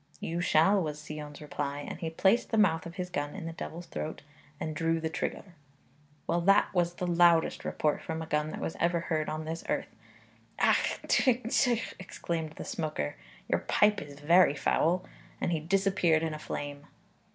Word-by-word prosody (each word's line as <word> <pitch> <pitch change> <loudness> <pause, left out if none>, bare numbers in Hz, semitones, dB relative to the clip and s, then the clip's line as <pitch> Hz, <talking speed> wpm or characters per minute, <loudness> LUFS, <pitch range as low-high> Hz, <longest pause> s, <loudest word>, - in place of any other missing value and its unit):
'You 170 +1 -2
shall,' 185 +4 +4
was 150 -2 -4
Sion's 150 -1 -7
reply, 145 -1 -3
and - - -6
he 165 -3 -2
placed 195 +8 +2
the 225 - 0
mouth 170 -6 +3
of 170 - -10
his 180 -1 -4
gun 145 -3 -3
in 195 -4 -6
the 165 - -4
devil's 170 +1 -7
throat 155 -3 -5 0.4
and 155 -1 -3
drew 165 +1 +1
the 160 0 -3
trigger. 180 - -3 0.8
Well; 170 - +1
that 195 +3 +4
was 175 -1 +1
the 180 - -3
loudest 170 -1 +4
report 150 -1 0
from 160 0 -4
a 160 - -4
gun 150 -1 0
that - - -6
was - - -3
ever 170 0 +2
heard 155 -3 -1
on 155 0 -4
this 165 +1 -4
earth. - - -1 0.7
'Ach! - - +2
tw! 250 -3 +3
tw!' 240 -1 +1
exclaimed 165 -3 -4
the - - -8
smoker, 150 - -3 0.3
'your - - +2
pipe 210 0 +3
is 145 -1 -10
very 170 0 +5
foul,' 170 +5 +1 0.3
and - - 0
he 165 - +1
disappeared 180 -1 +2
in 160 -1 -1
a 155 - -6
flame. 145 -1 -6
165 Hz, 185 wpm, -30 LUFS, 155-180 Hz, 0.8 s, very